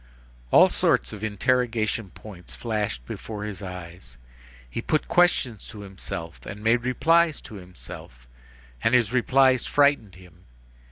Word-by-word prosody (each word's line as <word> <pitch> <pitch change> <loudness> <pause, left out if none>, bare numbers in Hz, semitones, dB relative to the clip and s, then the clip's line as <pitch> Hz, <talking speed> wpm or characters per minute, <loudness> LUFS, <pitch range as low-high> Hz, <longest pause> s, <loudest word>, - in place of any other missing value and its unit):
All - - +7
sorts - - +1
of 105 0 -8
interrogation 115 -1 0
points 90 -2 -11
flashed 105 - -3
before 105 - -6
his 105 -3 -5
eyes. 90 -2 -9 0.5
He 90 - -5
put 155 +5 0
questions 145 - +2
to 110 -3 -10
himself, 95 -4 -7
and 105 0 -8
made 115 +2 +3
replies 160 +5 +3
to - - -12
himself, 90 - -11 0.6
and 120 - +4
his 120 -2 +2
replies 130 0 +3
frightened 140 -10 +2
him. 90 -2 -17
110 Hz, 130 wpm, -25 LUFS, 95-125 Hz, 0.6 s, All